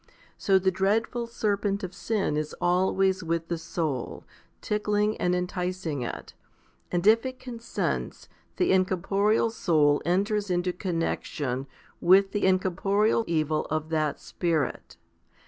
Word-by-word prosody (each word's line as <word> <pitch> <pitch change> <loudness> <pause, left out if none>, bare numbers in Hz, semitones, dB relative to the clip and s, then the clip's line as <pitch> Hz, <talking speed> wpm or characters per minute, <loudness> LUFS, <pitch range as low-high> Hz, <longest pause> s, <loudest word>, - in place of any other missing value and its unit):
So 195 -1 +3
the 190 0 +2
dreadful 220 +5 0
serpent 205 -3 -1
of 185 0 -5
sin 200 -4 -1
is 150 0 -3
always 190 +1 +2
with 165 0 -2
the 170 - -1
soul, 160 -6 -3 0.4
tickling 210 0 0
and 180 0 +1
enticing 180 -4 -3
it; 120 - -6 0.6
and 175 +1 -1
if 220 +2 +6
it 260 -1 -5
consents, 235 -2 -4 0.3
the 360 - +2
in 190 0 +5
corporeal 200 +4 +1
soul 150 -8 +2
enters 200 +3 0
into 180 0 0
connexion 155 -7 -2 0.3
with 195 +2 +5
the 205 - +1
incorporeal 195 +4 +2
evil 155 -2 0
of 155 0 -2
that 155 -2 0
spirit. 165 -5 -2
185 Hz, 130 wpm, -27 LUFS, 165-205 Hz, 0.6 s, if